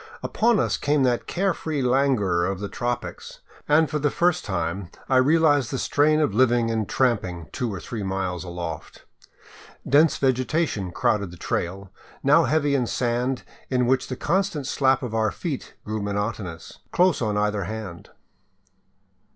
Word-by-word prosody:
Upon 230 -1 +2
us - - +1
came 145 -1 +1
that 125 -2 +1
care 190 +1 0
free 155 -5 -3
languor 125 -9 +2
of 95 +1 -1
the 100 - -4
tropics, 120 +2 -5 0.3
and 155 +2 +4
for 150 - -2
the 145 0 +2
first 175 +3 +1
time 85 -1 -3 0.2
I 130 - +3
realized 145 -1 +4
the 135 - -2
strain 155 +4 +2
of 150 -10 +1
living 120 -1 +3
and 110 -2 -1
tramping 95 -10 0
two 120 -3 -2
or 95 - -5
three 110 +4 -6
miles 95 -3 -2
aloft. 85 -3 -7 0.8
Dense 150 +4 +4
vegetation 130 - 0
crowded 100 +2 0
the 90 - -12
trail, 95 +3 -3 0.3
now - - +5
heavy 145 +1 +1
In 130 -4 +1
sand 125 +2 -1 0.3
in 125 -1 +2
which 130 +1 +1
the 130 - -4
constant 170 0 -1
slap 135 -1 +2
of 120 -3 -4
our 110 -1 +2
feet 150 - -5
grew 110 0 -3
monotonous, 100 -4 -4
close 180 -3 +3
on 105 -3 0
either 105 -2 0
hand. 105 -4 -7
120 Hz, 160 wpm, -24 LUFS, 100-145 Hz, 0.8 s, now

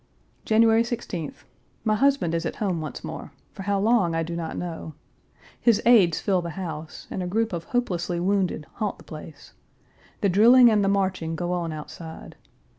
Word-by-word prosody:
January 225 +1 +5
16th. 200 - -4 0.4
My 215 - +2
husband 265 -6 +2
is 165 0 0
at 165 - -3
home 185 -6 -1
once 155 -3 -6
more - - -7 0.2
for - - -8
how 200 0 0
long, 205 -5 +2
I 165 - 0
do 170 +1 -5
not 165 -1 -4
know. 165 -3 -6 0.6
His 230 -4 +4
aides 200 -9 +5
fill 190 -3 +1
the 170 +1 -7
house, 160 -4 -6
and 190 - -3
a 180 - -3
group 220 +3 0
of 170 -1 -4
hopelessly 175 -8 -1
wounded 185 -4 0
haunt 210 -4 -2
the - - -15
place. 155 -1 -11 0.7
The 200 - +3
drilling 235 +6 +7
and 210 -2 +3
the 195 - +2
marching 185 -5 0
go 175 +2 -2
on 170 -2 -2
outside. 160 +1 -9
185 Hz, 180 wpm, -25 LUFS, 165-215 Hz, 0.7 s, drilling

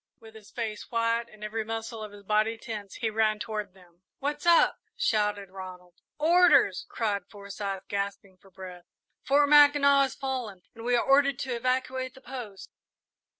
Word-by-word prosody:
With 220 -1 -15
his 220 -1 -14
face 220 -3 -5
white 230 0 0
and 215 0 -14
every 220 +1 -3
muscle 225 +1 -5
of 215 -1 -7
his 205 0 -14
body 215 +2 +1
tense, 210 -3 -7
he 225 -2 -2
ran 215 0 +1
toward 210 -3 -5
them. 175 -2 -21 0.2
"What's 295 +4 -3
up?" 340 -1 +5 0.2
shouted 210 -3 0
Ronald. 185 -2 -10 0.2
"Orders!" 310 - +4
cried 200 -5 -2
Forsyth, 200 -1 -6
gasping 200 -1 -4
for 195 +1 -21
breath. 180 -1 -11 0.4
"Fort 285 +1 +3
Mackinac 290 -1 +6
has 270 -1 0
fallen 245 -9 -5
and 230 - -11
we 245 0 +2
are 240 - +1
ordered 275 -1 +4
to 255 -3 -3
evacuate 255 +1 -2
the 265 - -15
post!" 245 -7 -8
220 Hz, 165 wpm, -28 LUFS, 200-260 Hz, 0.4 s, Mackinac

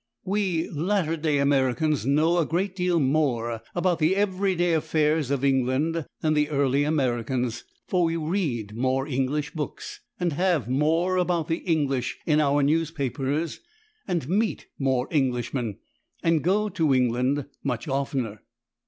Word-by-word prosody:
We 190 -4 0
latter 165 +1 0
day 155 -2 0
Americans 140 -1 +1
know 160 +5 +3
a 165 - +2
great 185 +3 -1
deal 180 -2 +1
more 130 -6 0
about 175 -1 +1
the 160 +4 +3
everyday 190 -3 +1
affairs 155 -2 +1
of 140 -1 0
England 135 +5 +1
than 155 -1 +2
the 150 0 +2
early 140 -1 +2
Americans, 125 -5 -1 0.2
for 180 -2 +2
we 165 0 0
read 155 - -2
more 130 +2 0
English 140 +2 -1
books, 150 -3 -6 0.2
and 175 -3 0
have 170 - +1
more 160 +8 +1
about 175 -3 0
the 165 - +1
English 140 -8 -1
in 155 -2 +3
our 145 0 +2
newspapers, 150 0 -1 0.5
and 170 -8 -1
meet 210 +6 0
more 130 -2 +1
Englishmen, 125 -5 -1 0.5
and 165 -3 +2
go 205 +5 +2
to 160 -8 +1
England 130 +3 +1 0.2
much 130 +3 -2
oftener. 135 -6 -2
150 Hz, 140 wpm, -25 LUFS, 130-170 Hz, 0.5 s, know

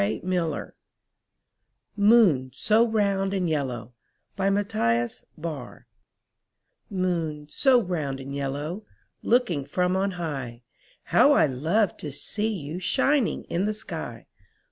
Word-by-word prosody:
t 105 +2 0
^ 175 -5 -1 1.2
MOON, 200 - +5
so 220 - +3
ROUND 200 -3 +1
AND 185 -2 0
YELLOW 125 -7 -2 3.0
Moon, 170 -6 -2
so 265 -3 +4
round 155 - -2
and 135 +1 -7
yellow. 145 +8 -3 0.4
Looking 225 - +2
from 180 +6 0
on 195 +1 +1
high, 135 -9 -5 0.4
How 290 - +5
I - - +5
love 165 - +1
to 150 - -6
see 210 +10 -3
you 165 -3 -5
Shining 270 +6 +1
in 180 +4 -1
the 215 0 -1
sky. 220 +1 -7
175 Hz, 105 wpm, -26 LUFS, 140-210 Hz, 3.0 s, MOON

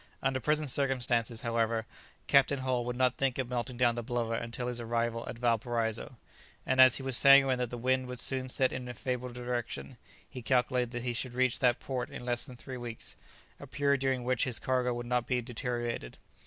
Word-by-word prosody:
Under 135 -1 +1
present 150 +2 +1
circumstances, 125 -4 0
however, 115 -1 0 0.4
Captain 140 0 +4
Hull 130 -2 -1
would 125 0 -3
not 125 0 +1
think 135 -2 0
of 130 -2 -2
melting 125 0 -3
down 120 -1 +3
the 120 - -4
blubber 120 -1 -2
until 115 +2 -3
his 120 -1 -3
arrival 115 0 -1
at - - -6
Valparaiso, 115 +1 -1 0.5
and 130 0 +4
as 130 -2 +8
he 135 - -3
was 135 -2 0
sanguine 135 -1 +7
that 125 -2 -1
the 120 - -6
wind 130 +1 0
would 125 0 -6
soon 130 0 0
set 130 0 +1
in 125 -1 -5
a 120 - -6
favourable 125 +1 -3
direction, 120 - -4 0.3
he 125 - -9
calculated 125 0 +1
that 120 0 -5
he 125 -1 -1
should 125 0 -3
reach 130 -1 +2
that 125 -2 +3
port 130 -2 -4
in 125 - -8
less 120 +2 0
than 130 - -10
three 130 +1 -8
weeks, 120 -2 -7 0.4
a - - -10
period 140 -1 +1
during 130 -2 0
which 125 -1 +1
his 125 -3 -2
cargo 125 -1 0
would 120 0 -4
not 125 0 0
be 125 - +1
deteriorated. 120 - -4
125 Hz, 210 wpm, -31 LUFS, 120-130 Hz, 0.5 s, as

